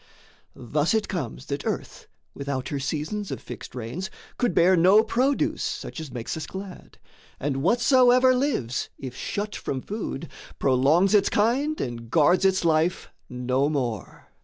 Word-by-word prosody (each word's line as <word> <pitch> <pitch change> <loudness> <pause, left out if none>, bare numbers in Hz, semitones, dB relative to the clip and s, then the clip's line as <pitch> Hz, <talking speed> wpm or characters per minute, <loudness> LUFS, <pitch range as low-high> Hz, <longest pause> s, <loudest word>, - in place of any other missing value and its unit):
Thus 150 - 0
it 220 - 0
comes 135 - -4
That 140 0 -4
earth, - - -4 0.3
without 140 -2 -4
her 140 - -2
seasons 155 +9 -3
of - - -4
fixed - - -9
rains, 125 +11 -5 0.3
Could 245 -8 +1
bear 180 +2 +5
no 190 +6 +6
produce 255 +5 0
such - - -4
as 155 -4 -7
makes 120 -2 -4
us 160 - -5
glad, 190 -1 -9 0.4
And 135 -1 -1
whatsoever 250 - +5
lives, 250 - -1
if 130 -2 -7
shut 205 +8 -4
from 135 - -3
food, 205 -9 -5 0.3
Prolongs 140 +9 +3
its 205 - +4
kind 265 +9 +1
and 115 -2 -5
guards 170 +7 +4
its 190 -2 +2
life 165 +2 +1 0.2
no 125 +3 0
more. 125 -9 -4
165 Hz, 150 wpm, -25 LUFS, 135-210 Hz, 0.4 s, no